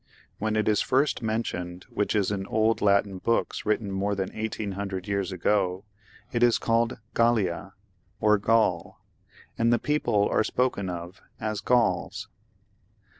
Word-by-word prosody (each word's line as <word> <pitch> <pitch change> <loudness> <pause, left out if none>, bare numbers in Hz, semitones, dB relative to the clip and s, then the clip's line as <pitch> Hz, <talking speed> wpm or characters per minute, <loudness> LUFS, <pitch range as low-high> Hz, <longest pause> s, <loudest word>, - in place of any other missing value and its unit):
When 110 +1 -1
it 110 - +1
is 105 -2 +3
first 135 +3 +1
mentioned, 90 -6 -3
which 105 - -1
is 100 -2 +1
in 95 -1 -3
old 110 +1 +1
Latin 100 -1 +2
books 115 +1 -1
written 105 -1 0
more 100 +1 -1
than 95 -1 -2
1800 100 -3 -4
years 100 -1 -1
ago, 95 +1 0 0.5
it 120 - -1
is 120 -1 +5
called 115 +2 +1 0.2
Gallia, 110 -7 +1 0.5
or 105 -1 +4
Gaul, 100 -5 +1 0.6
and 115 +1 +3
the 120 - +4
people 120 -8 +1
are - - +3
spoken 110 -6 0
of 85 +1 -7 0.2
as 110 -2 -3
Gauls. 120 0 +1
105 Hz, 140 wpm, -26 LUFS, 95-115 Hz, 0.6 s, is